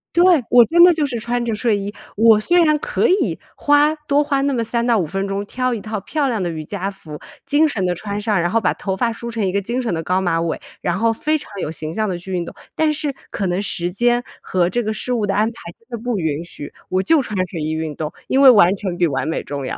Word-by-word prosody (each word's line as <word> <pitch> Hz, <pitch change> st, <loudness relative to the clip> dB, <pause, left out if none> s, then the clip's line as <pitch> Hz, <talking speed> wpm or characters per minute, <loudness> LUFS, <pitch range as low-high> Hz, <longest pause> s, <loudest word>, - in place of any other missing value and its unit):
对， 345 Hz, -5 st, +5 dB
我 240 Hz, -1 st, +7 dB
真 345 Hz, +5 st, +5 dB
的 355 Hz, -, +8 dB
就 310 Hz, -2 st, 0 dB
是 250 Hz, -4 st, -3 dB
穿 240 Hz, +2 st, -2 dB
着 230 Hz, -, -1 dB
睡 220 Hz, 0 st, +1 dB
衣， 200 Hz, +1 st, -5 dB, 0.2 s
我 220 Hz, 0 st, +5 dB
虽 345 Hz, +10 st, +4 dB
然 305 Hz, -2 st, +3 dB
可 -, -, 0 dB
以 375 Hz, +3 st, +1 dB, 0.2 s
花 290 Hz, +1 st, +3 dB
多 300 Hz, -1 st, 0 dB
花 280 Hz, -1 st, 0 dB
那 280 Hz, 0 st, +1 dB
么 235 Hz, -2 st, 0 dB
3 235 Hz, +1 st, -1 dB
到 235 Hz, -2 st, +3 dB
5 185 Hz, -, 0 dB
分 195 Hz, +5 st, -3 dB
钟 195 Hz, +1 st, -3 dB
挑 255 Hz, +4 st, -2 dB
一 230 Hz, -, -3 dB
套 215 Hz, 0 st, -4 dB
漂 280 Hz, +9 st, -1 dB
亮 225 Hz, -5 st, -1 dB
的 175 Hz, -, -1 dB
瑜 160 Hz, -2 st, -5 dB
伽 195 Hz, +2 st, -3 dB
服， 160 Hz, -7 st, -10 dB, 0.3 s
精 290 Hz, +3 st, +3 dB
神 210 Hz, -10 st, -2 dB
地 180 Hz, -, +1 dB
穿 200 Hz, +3 st, -5 dB
上， 210 Hz, -2 st, 0 dB
然 175 Hz, -, 0 dB
后 230 Hz, -, +2 dB
把 210 Hz, -, +1 dB
头 190 Hz, -1 st, -4 dB
发 235 Hz, +3 st, +1 dB
梳 235 Hz, +1 st, -7 dB
成 225 Hz, -3 st, -2 dB
一 185 Hz, -, 0 dB
个 200 Hz, +1 st, 0 dB
精 235 Hz, +6 st, -3 dB
神 235 Hz, -6 st, -2 dB
的 165 Hz, -, -2 dB
高 180 Hz, +3 st, 0 dB
马 170 Hz, -3 st, 0 dB
尾， 165 Hz, -1 st, -2 dB, 0.2 s
然 175 Hz, +1 st, -1 dB
后 225 Hz, +2 st, +2 dB
非 310 Hz, +7 st, 0 dB
常 290 Hz, -, -11 dB
有 -, -, -3 dB
形 155 Hz, 0 st, -5 dB
象 215 Hz, +1 st, -1 dB
地 180 Hz, -, -2 dB
去 180 Hz, +2 st, -9 dB
运 175 Hz, -1 st, -1 dB
动， -, -, -9 dB, 0.2 s
但 315 Hz, -1 st, +2 dB
是 295 Hz, -1 st, -2 dB, 0.2 s
可 200 Hz, -, -3 dB
能 180 Hz, +2 st, -1 dB
时 175 Hz, -3 st, -3 dB
间 240 Hz, +5 st, +1 dB, 0.2 s
和 180 Hz, -2 st, 0 dB
这 240 Hz, +6 st, 0 dB
个 215 Hz, -1 st, -2 dB
事 250 Hz, +3 st, -3 dB
物 220 Hz, -4 st, 0 dB
的 195 Hz, -, 0 dB
安 210 Hz, -, +3 dB
排 230 Hz, -, -5 dB, 0.3 s
真 230 Hz, -, -31 dB
的 225 Hz, -, -12 dB
不 245 Hz, -3 st, -1 dB
允 160 Hz, -3 st, -2 dB
许， 145 Hz, -4 st, -9 dB, 0.2 s
我 185 Hz, +1 st, +1 dB
就 320 Hz, +3 st, +4 dB
穿 215 Hz, -5 st, -5 dB
睡 175 Hz, -2 st, -7 dB
衣 155 Hz, +1 st, -2 dB
运 160 Hz, -1 st, -3 dB
动， 155 Hz, +1 st, -4 dB, 0.2 s
因 270 Hz, -, +2 dB
为 275 Hz, -, +9 dB
完 200 Hz, -6 st, +6 dB
成 185 Hz, -3 st, -4 dB
比 175 Hz, -, +3 dB
完 140 Hz, 0 st, -2 dB
美 160 Hz, -, -2 dB
重 140 Hz, -1 st, -5 dB
要。 -, -, -4 dB
215 Hz, 295 characters per minute, -20 LUFS, 180-250 Hz, 0.3 s, 为